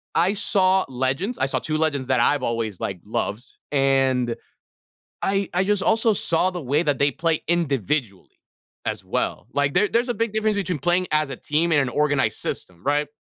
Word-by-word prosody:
I 180 +4 +3
saw 190 -3 +2
legends. 135 - -2
I - - +1
saw 135 - -1
2 155 -1 -2
legends 150 -5 0
that 130 -2 +2
I've 145 +4 +3
always, 115 -5 -2
like, 95 -3 -4
loved, 110 +2 -3 0.3
and 135 -3 +2 0.9
I 195 0 0
I 180 +2 +2
just 205 -1 +1
also 225 +1 +3
saw 180 -1 +1
the 175 -3 -5
way 145 +6 +1
that 145 -3 +1
they 140 +1 +3
play 165 +3 0
individually 135 - -1 0.5
as - - -3
well. - - -2
Like, 145 0 0
there 205 +3 +3
there's 240 +4 +1
a - - 0
big 230 -2 -1
difference 215 -1 +1
between 180 -5 -1
playing 175 +5 +1
as 155 -2 +1
a 130 - -5
team 165 +3 0
in 145 - +5
an 135 - 0
organized 140 -5 +1
system, 90 +2 -5
right? 145 +1 +1
150 Hz, 190 wpm, -23 LUFS, 130-185 Hz, 0.9 s, in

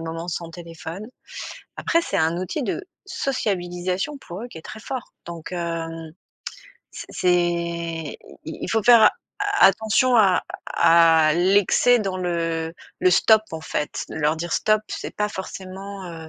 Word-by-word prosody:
moments 165 +1 -5
sans 170 -1 -4
téléphone. 170 +4 -8 0.7
Après, 335 - +2
c'est 200 - -2
un 165 -1 +2
outil 185 - -3
de 220 - -2 0.2
sociabilisation 190 - -2
pour 185 -5 -8
eux, - - -5
qui 165 - -10
est 160 - -12
très 215 - -9
fort. 255 +2 -6
Donc, 170 -2 -8
hem, 165 -2 -4 0.8
c'est - - -8
c'est 180 - -1
i 170 -2 -1 0.3
i 160 - -7
il - - -3
faut 225 - +2
faire 235 0 +7 0.4
a 410 0 +5
attention 220 +6 +3
à 195 -5 +4 0.2
à 165 -2 +5
l'excès 200 +7 +4
dans 195 -4 -2
le 165 -2 -2 0.3
le 185 - +4
stop, 215 +4 +5
en 160 - -5
fait. 150 -1 -3
Leur 155 0 0
dire: 170 +1 -4
«Stop», 215 0 +2
c'est - - -6
pas 210 0 0
forcément, 190 0 -7
heu, 160 -1 -9
180 Hz, 155 wpm, -23 LUFS, 165-210 Hz, 0.8 s, faire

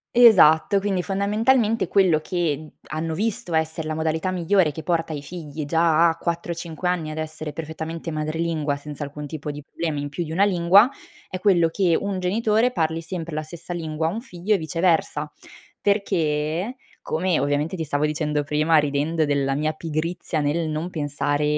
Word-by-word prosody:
Esatto, 200 -6 +7
quindi 195 -2 -1
fondamentalmente 215 +4 +2
quello 185 -6 +4
che 155 -2 -2 0.2
hanno 160 +1 -3
visto 200 -1 -2
essere 160 0 0
la 155 - -2
modalità 160 +3 -1
migliore 180 -2 +2
che 160 - -7
porta 165 -1 -1
i 145 - -4
figli 150 -1 -7
già 165 +1 +4
a 165 - -1
4-5 170 0 -3
anni 170 -4 -1
ad 155 - -7
essere 155 -1 -5
perfettamente 160 +1 -5
madrelingua, 155 -1 -1
senza 145 0 -7
alcun 145 +1 -7
tipo 150 0 -5
di 145 0 -8
problema 155 0 -4
in 145 0 -4
più 160 +5 -3
di 160 - -7
una 190 +5 +3
lingua, 195 +4 +5 0.4
è 185 - -5
quello 180 -4 +4
che 170 0 +2
un 200 -2 -2
genitore 220 +5 +2
parli 165 -5 -1
sempre 165 -1 -5
la 155 - -2
stessa 170 +3 -8
lingua 160 -2 -2
a - - 0
un 220 +5 -4
figlio 200 -3 -1
e - - +2
viceversa. 160 -3 0 0.5
Perché, 180 - 0 0.2
come 175 +2 0
ovviamente 145 +4 0
ti 165 - -3
stavo 145 0 0
dicendo 150 -1 -1
prima 150 +3 +2
ridendo 150 +2 +1
della 140 -2 0
mia 155 +2 0
pigrizia 165 +1 -3
nel 150 +3 0
non 155 +3 -3
pensare 145 -2 -1
160 Hz, 170 wpm, -23 LUFS, 155-180 Hz, 0.5 s, Esatto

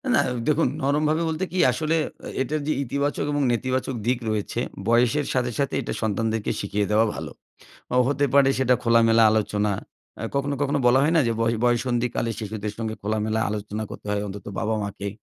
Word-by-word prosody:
না। - - +4 0.3
দেখুন, 155 +2 +3
নরমভাবে 150 +3 +1
বলতে 160 +4 -2
কি? 185 - -4
আসলে 155 +5 0 0.3
এ - - -5
এটার 155 +3 -1
যে 155 - +2
ইতিবাচক 140 +2 -1
এবং 145 - +1
নেতিবাচক 130 +2 -1
দিক 125 -1 +2
রয়েছে, 110 +2 -2 0.3
বয়সের 125 +5 +3
সাথে, 125 -1 0
সাথে 140 - 0
এটা - - -4
সন্তানদেরকে 110 0 -1
শিখিয়ে 100 0 -1
দেওয়া 110 +2 +4
ভালো। - - -6 0.6
অ - - +4
হতে 145 0 +1
পারে 140 -1 +6
সেটা 130 -1 +3
খোলামেলা 115 -1 +5
আলোচনা। 105 -1 +1 0.5
অ্যা - - -4
কখনো, 140 +1 0
কখনো 145 0 +1
বলা 130 +2 +5
হয় 160 +3 +2
না - - +6
যে - - +2
ব - - +1 0.2
বয়ঃসন্ধিকালে 120 -1 +1
শিশুদের 105 -1 -4
সঙ্গে 110 -1 -3
খোলামেলা 110 +1 -1
আলোচনা 105 +1 -4
করতে - - -9
হয়, 105 0 0
অন্তত 100 +1 -8
বাবা-মাকে। 105 -2 -2
120 Hz, 175 wpm, -24 LUFS, 110-140 Hz, 0.6 s, পারে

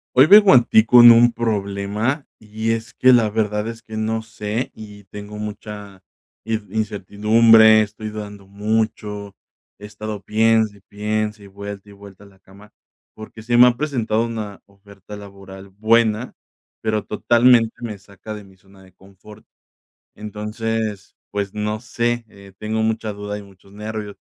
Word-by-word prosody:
Hoy 130 +3 +7
vengo 205 -1 +8
a 120 -2 +6
ti 110 - +4
con 120 +1 +8
un 120 +1 +6
problema. 105 +4 -2
Y 110 +1 -3
es 115 0 -4
que 130 0 +4
la 115 -3 +3
verdad 105 0 -1
es 115 0 -8
que, 110 - -9
no 110 +1 -1
sé, 110 +1 -4
y 105 -2 -12
tengo 105 +2 -10
mucha 105 -2 -8 0.4
in 110 -1 -3
incertidumbre, 110 +1 +4
estoy 110 +1 -6
dudando 105 -2 -9
mucho, 105 0 -3 0.4
he 105 - -10
estado 105 0 -7
piense, 110 0 +1
y - - -24
piense, 105 0 -4
y - - -12
vuelta, 100 +1 -9
y 100 - -14
vuelta 100 0 -15
a - - -16
la 95 -1 -21
cama, 100 +2 -18 0.4
porque 110 0 -11
se 120 +1 0
me 125 +1 +8
ha 120 - -1
presentado 120 -6 -1
una 110 -4 -6
oferta 100 0 -14
laboral 100 -1 -12
buena, 110 +3 +1 0.5
pero 110 -1 -1
totalmente 120 +1 +3
me 115 -3 -6
saca 100 +2 -11
de 105 -1 -10
mi 95 -1 -20
zona 95 +1 -21
de 95 -1 -20
confort. 100 +3 -17 0.7
Entonces, 105 0 -5 0.2
pues, 100 -1 -4
no 105 0 -2
sé, 120 0 -2
eh, 100 -2 -16
tengo 110 +1 -2
mucha 110 -1 -2
duda 105 0 -6
y - - -10
muchos 100 0 -19
nervios. 105 -1 -6
105 Hz, 160 wpm, -20 LUFS, 100-110 Hz, 0.7 s, vengo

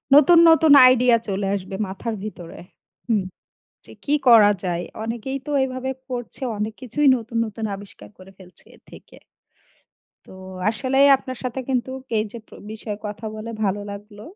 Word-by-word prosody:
নতুন, 330 +4 +7
নতুন 320 -2 +5 0.2
আইডিয়া 250 -2 +4
চলে 195 0 -2
আসবে 190 0 -6
মাথার 220 +4 -5
ভিতরে। 175 -6 -9 0.5
হুম। 210 -4 +2 0.6
যে - - -13
কি 295 - +1
করা 215 -3 +7
যায়? 175 -1 -2 0.2
অনেকেই 235 +4 -4
তো - - -5
এভাবে 255 0 -4 0.2
করছে, 245 +1 -6 0.2
অনেক 215 +1 -3
কিছুই 275 +4 +1
নতুন, 230 0 -8
নতুন 220 +1 -7
আবিষ্কার 200 0 -12
করে 190 +1 -15
ফেলছে 180 -1 -14
এ - - -23
থেকে। - - -15 1.1
তো, - - -16 0.4
আসলে 260 +4 -2 0.2
আপনার 255 -2 -8
সাথে 255 +1 -4
কিন্তু 255 -1 -1 0.3
এই 215 - +1
যে 235 - -8
প্র - - -18 0.2
বিষয়ে 215 -1 -6
কথা 210 +1 -7
বলে 215 +2 -7
ভালো 205 +1 -1
লাগলো। 205 +1 -11
225 Hz, 160 wpm, -22 LUFS, 205-255 Hz, 1.1 s, নতুন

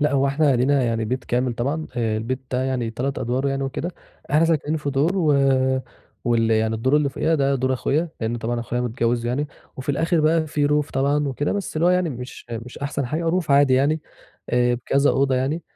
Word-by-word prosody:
لأ، 150 0 +2
هو 140 0 +3
إحنا 140 -1 +2
لينا 135 +2 +2
يعني 115 -2 0
بيت 125 +4 -3
كامل 125 0 0
طبعًا، 145 +7 -2
آآ، 110 -2 0
البيت 125 +4 -3
ده 130 0 0
يعني 125 -3 -1
3 130 +4 -3
أدوار 130 +4 -1
يعني 135 0 -1
وكده، 135 +6 -3 0.4
إحنا 155 +3 +4
ساكنين 160 -1 +1
في 145 -2 -3
دور، 145 +6 +2
و 155 -5 +3 0.9
وال 115 -1 +2
يعني 110 0 +2
الدور 130 +6 +2
اللي 150 -2 +2
فوقينا 160 +4 0
ده 140 -2 +2
دور 130 0 0
أخويا، 150 +6 0
لإن 115 +1 -1
طبعًا 120 +1 -2
أخويا 120 +1 -3
متجوز 120 0 -1
يعني، 135 +5 -1 0.3
وفي 130 +2 -8
الآخِر 165 +3 +1
بقى 160 +1 +2
في 145 -1 0
roof 150 0 +1
طبعًا 140 +2 +1
وكده، 145 +3 -1
بس 200 -5 -4
اللي 165 +2 +2
هو - - +5
يعني 180 -3 +2
مش 125 0 -8
مش 115 +2 -7
أحسن 140 -2 -2
حاجة، 165 +5 -1
roof 175 -4 -1
عادي 140 -2 +5
يعني، 145 +4 +2 0.5
آآ، 125 0 +3
بكذا 140 +4 +2
أوضة 135 -1 +2
يعني، 140 +6 -1
135 Hz, 215 wpm, -22 LUFS, 120-150 Hz, 0.9 s, هو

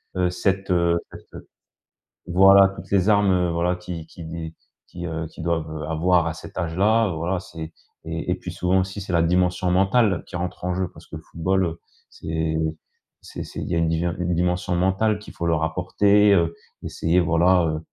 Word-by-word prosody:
heu, 90 -1 +1
cette, 95 +2 -1
heu 85 -1 +3
cette, - - -14
heu - - -11 0.8
voilà 95 +2 +7
toutes 95 -1 -11
les 100 -1 +2
armes 95 -4 +3
voilà 85 +2 0
qui 90 -2 -7
qui 85 0 -11
d 80 0 -6 0.3
qui, 85 0 -8
heu, 80 -1 -4
qu'ils 80 - -10
doivent, 80 -2 -1
heu, 75 -1 -5
avoir 85 +1 +2
à 80 - -2
cet - - -11
âge 80 -1 -2
là, 110 +3 +3
voilà 85 +3 -2
c'est 80 -3 -9 0.3
et - - -4
et - - +1
puis - - -8
souvent 95 +1 +1
aussi 95 +2 -5
c'est 95 -1 -5
la 85 - +4
dimension 90 +1 +1
mentale 95 +1 +2
qui - - -9
rentre 90 0 -4
en 90 - 0
jeu. 95 -1 -2
Parce - - -15
que - - -9
le - - -11
football, 85 +1 -1 0.3
c'est 80 0 -3 0.7
c'est - - -8
c'est, - - -7
il - - -5
y 85 - 0
a - - +1
une 85 - +2
di 80 +1 0
une 90 0 -1
dimension 90 +1 0
mentale 95 +4 +1
qu'il 105 - -12
faut 85 - -3
leur 80 -2 +1
apporter, 100 +5 +3
heu, 85 -3 +2 0.3
essayer 85 +2 0
voilà 85 +2 +3
heu, 80 0 -2
90 Hz, 205 wpm, -23 LUFS, 85-95 Hz, 0.8 s, voilà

